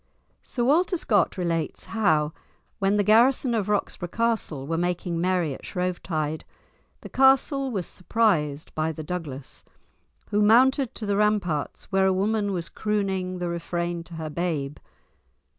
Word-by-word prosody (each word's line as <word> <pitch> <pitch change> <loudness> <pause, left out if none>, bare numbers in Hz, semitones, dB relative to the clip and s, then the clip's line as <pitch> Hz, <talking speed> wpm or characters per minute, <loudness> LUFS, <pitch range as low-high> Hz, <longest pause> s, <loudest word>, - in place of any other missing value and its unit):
Sir 240 - -3
Walter 345 +8 +3
Scott 210 -9 +1
relates 165 -3 -2
how, 160 -9 +1 0.5
when 195 +1 +2
the 205 - +3
garrison 240 +4 +4
of 210 -3 -1
Roxburgh 190 -4 -2
Castle 225 -12 -1
were 165 +3 -2
making 175 0 -1
merry 180 -5 +1
at - - -11
Shrovetide, 165 -4 -2 0.6
the - - -8
castle 270 +1 +3
was 195 -8 -2
surprised 165 -8 0
by 155 +1 -1
the 155 0 -7
Douglas, 150 -5 -6 0.7
who 210 - +2
mounted 250 +4 +4
to 220 - -5
the 200 -1 0
ramparts 205 -8 0
where 190 0 +3
a 190 - +3
woman 205 +2 0
was 175 -3 -3
crooning 190 -3 -2
the 180 -1 -3
refrain 170 0 -3
to 170 - -10
her 160 -1 -5
babe. 150 -4 -2
185 Hz, 145 wpm, -25 LUFS, 165-215 Hz, 0.7 s, garrison